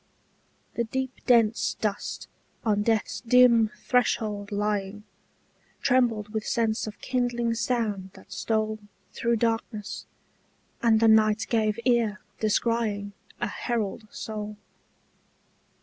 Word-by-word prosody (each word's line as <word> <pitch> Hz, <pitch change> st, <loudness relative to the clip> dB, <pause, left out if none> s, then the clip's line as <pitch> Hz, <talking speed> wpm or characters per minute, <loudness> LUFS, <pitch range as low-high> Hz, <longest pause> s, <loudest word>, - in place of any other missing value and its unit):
The 235 Hz, -, 0 dB
deep 260 Hz, +3 st, -2 dB, 0.2 s
dense 230 Hz, -3 st, +3 dB
dust 210 Hz, -2 st, -3 dB, 0.4 s
on 205 Hz, -2 st, +2 dB
death's 220 Hz, 0 st, 0 dB
dim 235 Hz, -2 st, +5 dB
threshold 215 Hz, -4 st, 0 dB
lying 205 Hz, 0 st, -2 dB, 0.8 s
Trembled 240 Hz, -5 st, +2 dB
with 215 Hz, 0 st, -3 dB
sense 220 Hz, -1 st, 0 dB
of 210 Hz, -, -8 dB
kindling 240 Hz, -2 st, 0 dB
sound 220 Hz, -5 st, -1 dB
that -, -, -16 dB
stole 215 Hz, -1 st, -1 dB, 0.3 s
Through 235 Hz, 0 st, +1 dB
darkness, 225 Hz, -2 st, -2 dB, 0.7 s
and 230 Hz, -3 st, +4 dB
the 225 Hz, -, +4 dB
night 215 Hz, -1 st, +4 dB
gave 215 Hz, -2 st, +1 dB
ear, 230 Hz, -4 st, +2 dB, 0.2 s
descrying 215 Hz, -2 st, 0 dB, 0.3 s
A -, -, +1 dB
herald 225 Hz, -2 st, -3 dB
soul. 210 Hz, -1 st, -6 dB
220 Hz, 105 wpm, -27 LUFS, 210-235 Hz, 0.8 s, dim